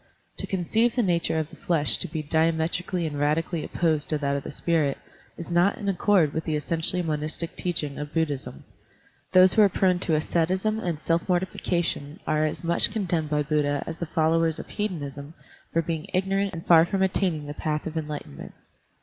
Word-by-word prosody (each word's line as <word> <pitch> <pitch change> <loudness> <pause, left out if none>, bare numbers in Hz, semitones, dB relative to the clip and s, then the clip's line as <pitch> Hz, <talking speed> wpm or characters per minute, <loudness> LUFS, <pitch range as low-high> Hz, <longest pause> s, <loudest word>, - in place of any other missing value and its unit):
To - - -3
conceive 220 +6 +1
the 245 - +2
nature 170 -4 +1
of 155 0 -2
the - - -11
flesh 160 -4 +2
to - - -4
be 155 0 -4
diametrically 165 +3 0
and 150 -2 -3
radi 150 +3 +2
cally 170 -3 -3
opposed 160 -4 0
to 155 - +1
that 140 -1 -1
of 140 - -2
the - - -6
spirit 155 -5 0 0.4
is 170 +1 -6
not 175 +4 +3
in 205 - -5
accord 190 -5 +3
with 160 - -3
the 155 - -1
essentially 165 +4 0
monistic 155 +1 -3
teaching 155 -5 -3
of 150 0 -5
Bud 160 -2 +1
dhism. 135 - -6 0.7
Those 185 0 +7
who 220 - +5
are 205 - +6
prone 185 -1 +2
to 165 -3 +1
asceticism 185 +7 0
and 175 -7 -2
self 165 +3 0
mortification 175 -3 -1
are 155 0 +1
as 155 - -5
much 170 +3 +2
condemned 175 -8 -1
by 150 0 +1
Buddha 145 -1 0
as 165 - -6
the 170 - -3
followers 160 0 +2
of - - -8
hedonism 150 -7 -4 0.4
for 165 - +1
being 165 +1 -3
ignorant 195 +1 0
and 165 - -7
far 165 -2 +7
from 190 +3 0
attaining 180 -5 0
the 145 - -5
path 150 0 -2
of 160 - -5
enlightenment. 150 - -6
165 Hz, 195 wpm, -26 LUFS, 150-180 Hz, 0.7 s, Those